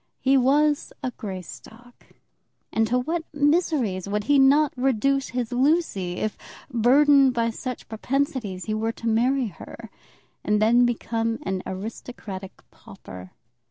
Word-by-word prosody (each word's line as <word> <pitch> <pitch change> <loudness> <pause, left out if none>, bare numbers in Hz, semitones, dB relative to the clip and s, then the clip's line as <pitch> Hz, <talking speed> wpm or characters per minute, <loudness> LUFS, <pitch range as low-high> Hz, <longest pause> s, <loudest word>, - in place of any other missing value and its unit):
He 270 +1 +3
was 290 +3 +2
a 255 - -2
Greystock, 220 +4 -10 0.7
and 225 0 +2
to 245 +3 +1
what 320 +7 -2
miseries 285 - +1
would 210 +1 -1
he 280 +5 +3
not 280 +2 +4
reduce 270 +2 +1
his 245 -1 -3
Lucy 250 - +1
if, 215 +3 -3 0.3
burthened 270 +3 +5
by 230 -1 +1
such 250 +2 -6
propensities, 230 -4 -2
he 215 - -2
were 225 +1 -1
to 230 - -6
marry 245 +2 +1
her - - -12 0.5
and 210 0 +1
then 240 +3 +4
become 230 -1 -2
an 190 -8 -2
aristocratic 195 -1 -8
pauper! 90 0 -12
240 Hz, 130 wpm, -24 LUFS, 215-275 Hz, 0.7 s, burthened